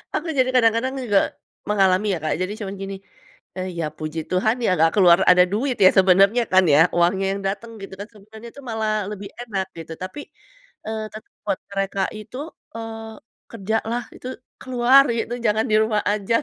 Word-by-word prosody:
Aku 305 - -2
jadi 255 0 +3
kadang-kadang 230 +2 +3
juga 205 -5 +3 0.5
mengalami 195 0 +3
ya 175 - -2
Kak, 155 - 0
jadi 185 +3 -2
cuma 200 -3 -5
gini, 195 0 -6 0.6
eee, 185 0 -3
"Ya 165 - 0
puji 155 +1 -4
Tuhan 205 +5 +1
ya - - +3
nggak 165 +1 +4
keluar," 180 -4 +6
ada 180 0 +6
duit 255 +4 0
ya - - +10
sebenarnya 195 +5 +5
kan 185 0 +6
ya, 145 - +6 0.2
uangnya 185 +3 +2
yang 200 - -5
dateng 225 +4 -4
gitu 195 - -9
kan, 205 - -6
sebenarnya 220 +3 -13
itu 280 - -12
malah 220 -1 -1 0.2
lebih 200 -1 -7
enak 200 -6 -3
gitu. 165 0 -8
Tapi, 185 +10 -6 0.7
eee, 220 0 -3
tet 215 - -9 0.2
buat 200 -2 -1
mereka 195 0 -2 0.2
itu, 215 +4 -10 0.4
eee, 225 -1 -7 0.4
kerjalah 225 +2 -2
itu - - -9 0.3
keluar 255 +2 +5
gitu, 235 - -3
jangan 215 +1 +2
di - - +4
rumah 220 -1 +1
aja, 210 +2 0
210 Hz, 180 wpm, -22 LUFS, 190-225 Hz, 0.7 s, ya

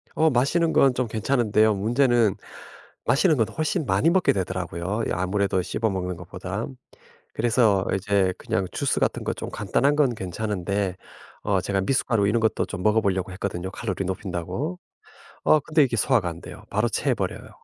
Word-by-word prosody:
어 160 0 +4
마시는 155 +6 +2
건 135 -2 +5
좀 125 -1 -1
괜찮은데요. 110 -1 +2
문제는 115 0 +2 0.7
마시는 150 +7 +3
건 115 - +2
훨씬 155 -1 -1
많이 100 +10 +2
먹게 190 +1 +3
되더라고요, 95 +2 -3
이 - - -3
아무래도 95 +1 0
씹어 110 +5 -1
먹는 90 -2 -3
것보단. 95 +7 -6 0.6
그래서 110 -5 +2
이제 95 -1 +1
그냥 95 0 -1
주스 - - 0
같은 - - 0
거 - - -1
좀 - - -6
간단한 140 +3 +1
건 140 -5 +3
괜찮은데 100 -1 -2 0.5
어 100 -2 +1
제가 100 -1 0
미숫가루 110 -2 +1
이런 115 +2 +2
것도 110 - +1
좀 90 - -6
먹어보려고 100 -4 +1
했거든요, 95 -1 -4
칼로리 95 -4 -3
높인다고. 95 - -4 0.7
어 155 - +5
근데 155 +2 +3
이게 120 -3 -1
소화가 110 -6 +2
안 85 0 -8
돼요. - - -11
바로 - - +1
체해버려요. - - -2
105 Hz, 365 characters per minute, -24 LUFS, 95-125 Hz, 0.7 s, 건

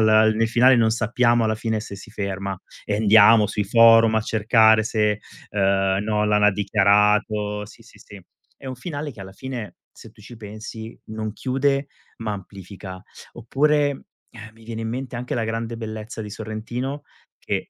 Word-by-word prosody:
alla 110 0 +5
nel 115 +1 0
finale 125 +3 +5
non 115 -1 +3
sappiamo 120 +1 +2
alla 110 0 +1
fine 110 0 -2
se 100 -2 -8
si 100 - -13
ferma 100 -2 -4 0.3
e 105 - 0
andiamo 110 +1 +6
sui 105 0 -2
forum 115 +1 +6
a 110 - +3
cercare 110 0 +4
se, 105 -2 0 0.3
ehm, 95 -1 +1
Nolan 105 -1 +1
ha 105 - +5
dichiarato 105 +1 +1
sì 115 - -16
sì 110 -2 -19
sì. 100 -1 -13 0.4
È 135 - -13
un 130 - -4
finale 145 +2 -6
che 105 - -14
alla 95 0 -9
fine, 125 -1 -7 0.2
se - - -14
tu - - -21
ci 120 - -12
pensi, 110 +1 -9
non 110 0 -5
chiude 135 +1 0 0.3
ma 110 -2 -3
amplifica. 95 -1 -9 0.3
Oppure, 145 +4 0 0.3
ehm, 110 -2 -11
mi 115 - -18
viene 115 0 -6
in 110 - -3
mente 130 +2 -5
anche 125 +1 -4
La 115 - -1
Grande 115 +1 -4
Bellezza 110 0 -7
di 105 - -8
Sorrentino 115 +6 -5 0.4
che - - -3
110 Hz, 175 wpm, -22 LUFS, 105-115 Hz, 0.4 s, andiamo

